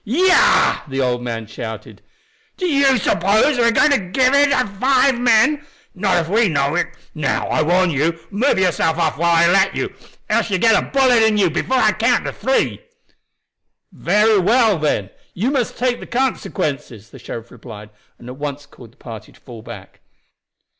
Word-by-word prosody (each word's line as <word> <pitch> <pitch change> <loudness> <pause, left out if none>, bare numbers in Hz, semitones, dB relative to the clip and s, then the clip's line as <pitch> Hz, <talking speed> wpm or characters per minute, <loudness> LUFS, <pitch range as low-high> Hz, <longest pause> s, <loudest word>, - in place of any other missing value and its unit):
"Yah!" 360 - +3
the 135 -1 -5
old 125 -2 -1
man 115 -2 -5
shouted. 110 +1 -9 0.6
"Do 370 - -3
you 280 -5 +2
suppose 210 - +1
we - - +3
are 235 - +3
going 290 +5 +3
to 285 - +3
give 255 +8 0
in 285 0 +4
to 255 -3 +1
five 255 +5 +1
men? 245 +5 +2 0.3
Not 190 0 0
if 165 -2 -1
we 215 +5 +2
know 140 -2 0
it. 175 - 0 0.3
Now, 155 -2 -2
I - - 0
warn 180 +3 +1
you, 160 +3 -1
move 220 +6 0
yourself 170 -3 0
off 160 -3 -1
while 170 0 +1
I 165 +1 +4
let 190 +3 +2
you, - - -4 0.3
else - - 0
you 195 - -1
will 185 - -3
get 225 -2 +3
a - - -10
bullet 260 -4 +3
in 220 -1 +2
you 190 -5 +2
before 260 +11 -1
I 215 -4 +3
count 230 +4 0
three." 265 - -1 1.1
"Very 210 0 +1
well, 220 0 +2
then. 105 -11 -2 0.2
You 225 +9 -1
must 260 -5 -2
take 245 0 -1
the - - -11
consequences," 155 - -4
the - - -13
sheriff 115 0 -9
replied, 105 -3 -12 0.3
and 120 - -14
at 125 +1 -9
once 145 0 -6
called 120 -5 -17
the - - -33
party 110 -3 -11
to - - -23
fall 120 -4 -12
back. - - -12
195 Hz, 190 wpm, -18 LUFS, -, 1.1 s, in